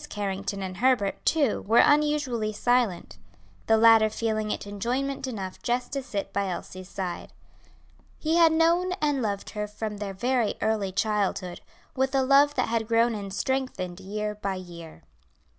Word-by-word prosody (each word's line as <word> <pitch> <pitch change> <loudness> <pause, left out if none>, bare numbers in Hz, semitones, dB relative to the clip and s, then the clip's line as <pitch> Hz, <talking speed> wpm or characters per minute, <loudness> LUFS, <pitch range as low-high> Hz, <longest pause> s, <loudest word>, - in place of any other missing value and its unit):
Carrington 200 -1 -3
and 185 -1 -6
Herbert, 240 -4 +1
too, 290 -8 +2
were 225 +3 +3
unusually 290 -7 +3
silent; 215 - 0 0.5
the 225 - +5
latter 225 -1 +6
feeling 215 -1 -2
it - - -3
enjoyment 255 +7 -2
enough 195 -7 -6
just 245 +1 -1
to 275 - -1
sit 200 -6 -5
by 200 -1 0
Elsie's 185 +1 -7
side. 185 -3 -5 0.9
He 320 +1 0
had 335 -1 +6
known 340 +3 +2
and 295 -7 0
loved 200 -3 -3
her 210 -1 -3
from 210 0 -5
their 200 -1 -5
very 240 +1 0
early 215 -3 0
childhood; 195 -3 -1 0.3
with 265 +1 0
a 265 - +3
love 280 +2 +4
that 255 - 0
had 225 -1 -1
grown 230 +1 +3
and 200 -2 -5
strengthened 200 -6 -2
year 210 +2 -4
by 200 -2 -3
year. 170 -3 -10
220 Hz, 160 wpm, -26 LUFS, 200-260 Hz, 0.9 s, latter